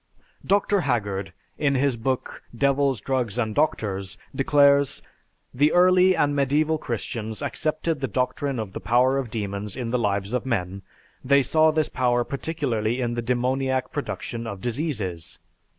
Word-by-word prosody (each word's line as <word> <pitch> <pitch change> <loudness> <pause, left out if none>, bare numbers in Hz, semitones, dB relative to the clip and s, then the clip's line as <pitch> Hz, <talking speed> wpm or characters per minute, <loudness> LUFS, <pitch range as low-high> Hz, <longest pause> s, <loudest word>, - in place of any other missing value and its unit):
Dr. 200 0 +2
Haggard 105 - -1 0.3
in 140 -2 +2
his 135 -1 +2
book, 130 +3 -3 0.2
"Devils, 140 -1 +2
Drugs, 125 -4 -1
and 110 -3 -1
Doctors," 100 -8 -1 0.2
declares, 140 0 +3 0.5
"The 145 +4 +3
early 185 +1 +5
and 145 -3 +1
Medieval 150 +3 +1
Christians 110 -3 -4
accepted 155 0 -1
the 135 - -1
doctrine 130 +3 -1
of 105 -4 -5
the - - -5
power 130 +3 +3
of 130 -4 -4
demons 105 0 -4
in 120 -3 -3
the 125 - +1
lives 100 -1 -1
of 125 - 0
men; 100 -6 -2 0.4
they 140 +1 +4
saw 155 +4 +4
this 155 -1 +1
power 120 -1 +1
particularly 130 -6 -2
in 120 -2 -1
the 120 - -2
demoniac 130 +2 0
production 115 -5 -4
of 100 -3 -6
diseases. 110 - -3
125 Hz, 150 wpm, -24 LUFS, 110-140 Hz, 0.5 s, early